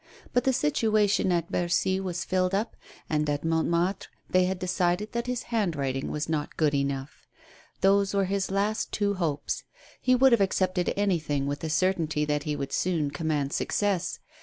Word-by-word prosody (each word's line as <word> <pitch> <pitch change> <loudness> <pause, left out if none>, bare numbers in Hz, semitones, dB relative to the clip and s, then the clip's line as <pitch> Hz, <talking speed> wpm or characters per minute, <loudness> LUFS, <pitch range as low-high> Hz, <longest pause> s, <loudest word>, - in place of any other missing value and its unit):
But 245 - +2
the 265 - +4
situation 210 - +2
at 170 -1 0
Bercy 180 +2 +1
was 180 -2 -3
filled 185 0 +1
up, 215 +3 -2 0.3
and 150 -1 0
at 145 0 -1
Montmartre 170 +3 0 0.2
they 185 0 +4
had 190 +1 -1
decided 185 +2 0
that 235 +1 -3
his 250 -1 -2
handwriting 145 - -1
was 150 0 -3
not 155 -2 -3
good 150 -2 +2
enough. 140 -1 -3 0.5
Those 195 +1 +3
were 195 -1 +3
his 195 0 -1
two - - -8
last 210 +2 0
hopes. 180 -8 -1 0.4
He 255 0 +4
would 265 +1 +5
have 235 -3 +4
accepted 185 -2 +1
anything, 160 -8 0
with 145 +1 -2
the 160 - -4
certainty 160 -3 +1
that 150 -1 -1
he 150 -1 -1
would 140 -1 -4
soon 165 -6 0
command 150 -3 -1
success. 200 -4 0
180 Hz, 170 wpm, -27 LUFS, 150-200 Hz, 0.5 s, would